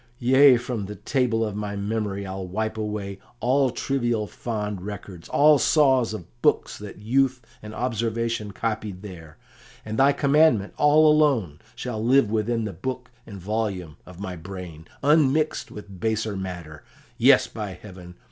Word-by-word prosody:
Yea, 130 +2 +6
from 120 -4 -4
the 105 - -7
table 120 -4 0
of 105 -2 -5
my 105 -1 -4
memory 100 -1 -3
I'll 95 0 -5
wipe 110 +4 -3
away 105 -2 -4 0.2
all 130 +2 +2
trivial 120 -4 -1
fond 105 -3 -4
records, 95 -3 -8
all 150 0 +5
saws 130 -7 +3
of 110 -6 -6 0.2
books - - +2
that 105 -1 -9
youth 130 +5 +1 0.2
and 105 - -9
observation 115 -2 -2
copied 105 -3 -4
there, 85 -6 -10 0.5
and 110 +2 -4
thy 135 +1 +6
commandment 140 -7 +3
all 150 +1 +5
alone 130 - +2 0.2
shall 110 -4 -4
live 125 -2 +4
within 115 +1 0
the 105 -2 -4
book 125 +7 -5 0.2
and 100 -3 -9
volume 95 -5 -3
of 90 -1 -12
my 95 -2 -5
brain, 85 -2 -9 0.2
unmixed 150 +1 +2
with 100 -3 -11
baser 110 0 -1
matter; 90 -5 -7 0.4
yes, - - +6
by 105 -3 -6
heaven! 90 -2 -12
110 Hz, 150 wpm, -24 LUFS, 100-125 Hz, 0.5 s, Yea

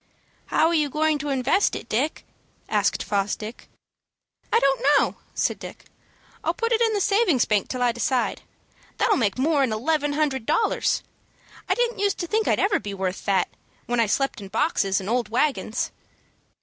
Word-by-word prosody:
"How 315 - +3
are 335 - +2
you 305 -3 +2
going 305 +1 +1
to 295 +1 -4
invest 275 +8 +2
it, - - -7
Dick?" 270 +8 -1 0.4
asked - - +1
Fosdick. 210 +3 -3 0.8
"I - - +5
don't 275 - +2 0.2
know," - - +1 0.2
said - - 0
Dick. - - -10 0.6
"I'll - - 0
put 460 -1 -1
it 460 0 +2
in 450 -1 +3
the 415 - +1
savings 395 - +3
bank 210 -2 +1
till 255 -1 -2
I 245 - +3
decide. 240 +1 -1 0.6
That'll - - +3
make 205 -4 0
more'n 275 -2 +2
eleven 290 +6 0
hundred 280 -6 -1
dollars. 455 - +1 0.7
I - - +3
didn't 485 -2 0
use 400 -1 +1
to 345 - -4
think 430 +5 0
I - - +4
ever'd 400 0 +1
be 200 -1 -5
worth 190 -1 -3
that, 195 -2 +2 0.4
when 240 0 -1
I 230 - +3
slept 270 +1 0
in 195 - -8
boxes 200 - +1
and 190 - -7
old 235 -1 0
wagons." 250 -1 0
275 Hz, 175 wpm, -24 LUFS, 220-325 Hz, 0.8 s, I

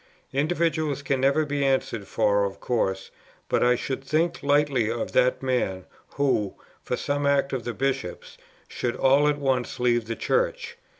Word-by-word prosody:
Individuals 155 -1 0
can 135 -1 0
never 140 +3 +3
be 145 -1 -1
answered 130 -6 0
for 100 0 +2
of 100 -1 -3
course; 95 -6 -1 0.4
but - - +1
I 125 0 +4
should 135 +2 -4
think 160 +5 0
lightly 140 -5 +2
of 115 0 -3
that 125 +1 +2
man, 95 -8 -1 0.3
who, 130 -8 +1 0.3
for - - -3
some 145 0 -1
act 140 -1 +2
of 130 -3 -3
the 120 - -3
Bishops, 135 -9 -3 0.3
should 120 -1 -3
all 140 +3 +4
at 150 -1 +2
once 130 -4 -1
leave 120 -2 +2
the 115 - -3
Church. 480 - -1
135 Hz, 165 wpm, -25 LUFS, 120-145 Hz, 0.4 s, I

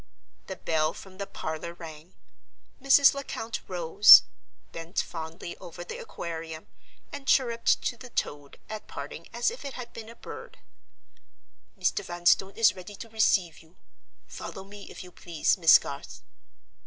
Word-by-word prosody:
The 190 - -5
bell 160 -2 0
from 190 0 -13
the 200 - -4
parlor 160 +2 -6
rang. 165 0 -11 0.7
Mrs. 275 0 +6
Lecount 235 -5 -5
rose, 180 +3 +8 0.5
bent 165 +2 -4
fondly 165 +1 -5
over 175 -1 -9
the - - -7
Aquarium, 160 -1 -7 0.5
and 285 -2 -8
chirruped 235 -3 +2
to 240 - -2
the 250 +2 -11
toad 145 -10 -4
at 215 -1 -7
parting 150 +4 -8
as 240 - 0
if 475 - -9
it 280 -2 -6
had 245 -1 -8
been 225 -1 -9
a 230 - -12
bird. - - -10 1.2
"Mr. - - 0
Vanstone 175 +3 +1
is 230 -1 +5
ready 190 +2 -10
to 230 - -10
receive 200 -6 +2
you. 160 +2 -21 0.5
Follow 190 - -8
me, 200 +1 -12
if - - -9
you 180 - -13
please, 170 -2 0
Miss 165 -4 +8
Garth." 140 - -9
185 Hz, 150 wpm, -27 LUFS, 165-225 Hz, 1.2 s, rose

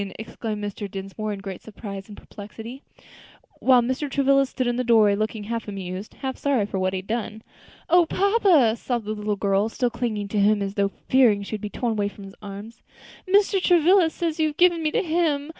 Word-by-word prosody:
exclaimed 220 -1 -5
Mr. 205 0 -5
Dinsmore 195 +3 -5
in 200 -1 -5
great 195 -2 -7
surprise 200 -3 -8
and 210 - -11
perplexity; 225 +5 -10 0.8
while 255 -2 +5
Mr. 260 +4 -2
Travilla 275 0 +3
stood 255 0 -3
in 240 0 0
the 255 - 0
doorway 220 -4 +5
looking 215 +1 -2
half 230 +2 -4
amused, 195 0 -6
half 265 -1 -5
sorry 270 -7 +1
for 200 -1 -4
what 185 0 0
he - - -1
had - - -22
done. 220 0 -4 0.4
"O 345 0 +4
papa!" 375 - +3
sobbed 240 -2 -3
the 215 - -2
little 210 -1 -2
girl, 200 +1 +1
still 245 +1 -1
clinging 225 -4 -3
to 210 - -1
him 205 +1 +4
as 195 0 -4
though 200 -1 +1 0.2
fearing 235 -6 +4
she - - -9
should 215 -2 -4
be 210 - -4
torn 235 0 -2
from 205 - -13
his 195 0 -11
arms, 205 +3 -9 0.5
"Mr. 395 0 +3
Travilla 355 0 +4
says 330 0 -3
you 315 - +3
have 300 0 -6
given 350 -2 +4
me 310 - +1
to - - 0
him. 315 -4 0
225 Hz, 210 wpm, -24 LUFS, 205-280 Hz, 0.8 s, while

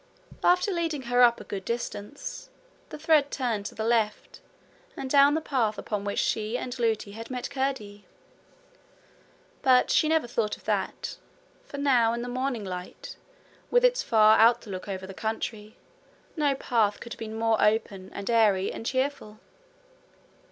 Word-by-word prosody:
After 360 +3 +3
leading 330 -6 -2
her 245 +1 +2
up 235 -1 +5
a - - -8
good 195 -2 -6
distance, 235 - -5 0.4
the - - -8
thread 305 -2 +3
turned 230 -8 -2
to - - -11
the 220 - -3
left, 225 -2 -1 0.6
and 270 - -4
down 280 +2 +5
the 320 - 0
path 235 -8 0
upon 205 -2 -4
which 200 - -3
she 220 +2 0
and 250 0 -5
Lootie 220 -3 0
had 225 +2 -9
met 255 +1 -5
Curdie. 260 -7 -3 1.5
But 255 -1 +4
she 310 - +3
never 320 -4 +2
thought 230 -3 -2
of - - -22
that, - - -2 0.5
for 285 - -9
now 250 -5 +3
in 235 0 -3
the - - -5
morning 255 -3 -2
light, 180 -1 -7 0.5
with - - +4
its - - +3
far 220 -2 +5
outlook 225 -5 +2
over 190 -1 -5
the 195 - -9
country, 220 0 -5 0.6
no 290 -4 +1
path 225 -6 0
could 235 - -8
have - - -13
been 220 -1 -6
more 225 -1 +1
open 210 -3 0
and 200 - -7
airy 210 -5 +3
and - - -7
cheerful. 260 -5 -2
230 Hz, 160 wpm, -27 LUFS, 210-270 Hz, 1.5 s, up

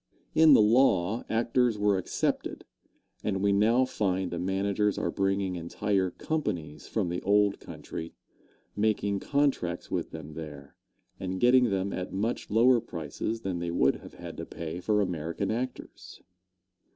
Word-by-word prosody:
In 160 -2 +7
the - - +6
law, 110 -3 +3
actors 115 0 +2
were 105 -2 +2
excepted, 90 - -2 0.6
and 95 -2 -1
we 100 - +4
now 115 +6 +4
find 95 -6 -1
the 85 - -3
managers 100 +2 0
are - - -1
bringing 95 -1 0
entire 95 +3 -1
companies 90 - -4
from 100 -6 -1
the 90 +1 -3
old 100 0 +3
county, 80 0 -8 0.6
making 105 -1 +1
contracts 135 -11 0
with - - -2
them 75 +1 -9
there, 75 -3 -9 0.5
and 95 0 -3
getting 125 +1 +5
them 95 0 -1
at 90 0 -4
much 105 +5 -2
lower 120 +3 +5
prices 85 +8 -4
than 95 -4 -3
they 85 0 -3
would 85 -5 +2
have - - -13
had - - -9
to - - -5
pay 85 0 -6
for 105 +3 +1
American 85 +1 -2
actors. 125 +3 -6
100 Hz, 150 wpm, -28 LUFS, 90-110 Hz, 0.6 s, In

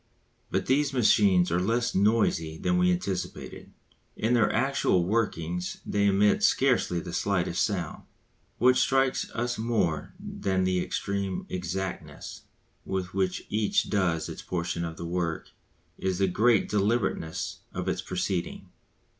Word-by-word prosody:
But 95 0 -1
these 140 +1 +2
machines 100 -7 +4
are 85 - +2
less 115 +6 0
noisy 95 -6 +2
than 180 - +1
we 180 0 +4
anticipated; 95 - -4 0.4
in 115 +3 0
their 120 -2 +3
actual 125 -7 +2
working 90 -5 -1 0.2
they 100 0 +1
emit 105 - +3
scarcely 130 - +2
the 85 0 -7
slightest 90 -3 0
sound. 90 -7 -2 0.6
What 125 +2 +4
strikes 135 -1 +2
us 120 0 -2
more 110 -9 -1
than 95 -1 -2
the 90 -1 0
supreme 100 -1 -2
exactness 90 +1 -5 0.4
with 95 -1 -3
which 95 -1 -1
each 105 0 +1
does 90 -6 +1
its - - -7
portion 85 -1 -3
of 80 -1 -5
the 85 - -6
work, 85 -1 -3 0.5
is 95 -1 -1
the 100 - +3
great 110 +3 +3
deliberateness 105 -6 -1
of - - -4
its - - -1
proceeding. 90 -1 -3
95 Hz, 135 wpm, -27 LUFS, 90-115 Hz, 0.6 s, machines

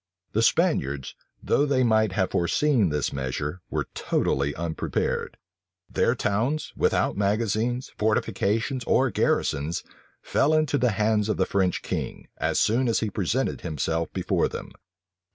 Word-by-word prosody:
The - - +2
Spaniards, 70 0 +1 0.3
though 145 - +2
they 130 -2 +2
might 110 -4 +3
have 95 -1 0
foreseen 115 - +2
this 75 -1 -1
measure, 70 +6 -3
were - - -1
totally 70 +1 0
unprepared. 85 -1 -2 0.5
Their 120 - +2
towns, 115 +8 -1
without - - +1
magazines, 110 +4 0
fortifications 110 +3 0
or 130 -2 +3
garrisons, 75 -3 0 0.4
fell 155 +2 +2
into 155 -2 +2
the 125 -3 +2
hands 105 +1 +1
of - - 0
the 95 - +2
French 95 -2 0
king, - - -4
as - - +1
soon 115 +4 +2
as 115 - +1
he 110 -2 -1
presented 105 +8 -1
himself 80 +1 -2
before - - 0
them. - - -7
105 Hz, 135 wpm, -25 LUFS, 85-120 Hz, 0.5 s, might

